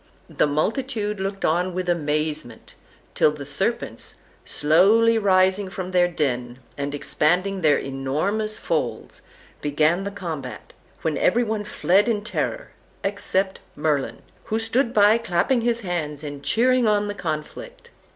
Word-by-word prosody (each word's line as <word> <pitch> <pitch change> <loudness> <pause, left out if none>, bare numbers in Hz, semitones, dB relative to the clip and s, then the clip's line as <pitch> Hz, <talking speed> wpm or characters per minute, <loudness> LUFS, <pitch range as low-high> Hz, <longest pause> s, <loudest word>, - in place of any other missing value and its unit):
The - - +2
multitude 210 - -1
looked 195 +1 -3
on 175 +3 +1
with 185 -1 -2
amazement, 150 -6 -2 0.4
till - - +4
the 150 -2 -7
serpents, 195 +11 -1 0.3
slowly 220 +9 +4
rising 190 -1 +3
from 185 -1 -5
their 180 -1 +4
den, 125 -7 -2 0.2
and 140 0 -3
expanding 180 +7 +1
their 155 -3 +4
enormous 155 +12 -2
folds, - - -3 0.4
began 155 +5 +2
the 200 - -3
combat, 165 -10 -7 0.3
when 155 -3 0
every 245 - +3
one 215 -2 -2
fled 205 +2 +2
in 210 -3 0
terror, 365 - -3 0.3
except 195 -1 -1 0.2
Merlin, 150 -3 -1 0.2
who 220 - -1
stood 230 +2 +1
by 210 +1 +5
clapping 230 +4 +1
his 235 0 +1
hands 160 -6 -3
and 145 -1 -6
cheering 250 - +3
on 210 -1 +2
the 205 - -3
conflict. 205 - -6
185 Hz, 135 wpm, -23 LUFS, 150-215 Hz, 0.4 s, by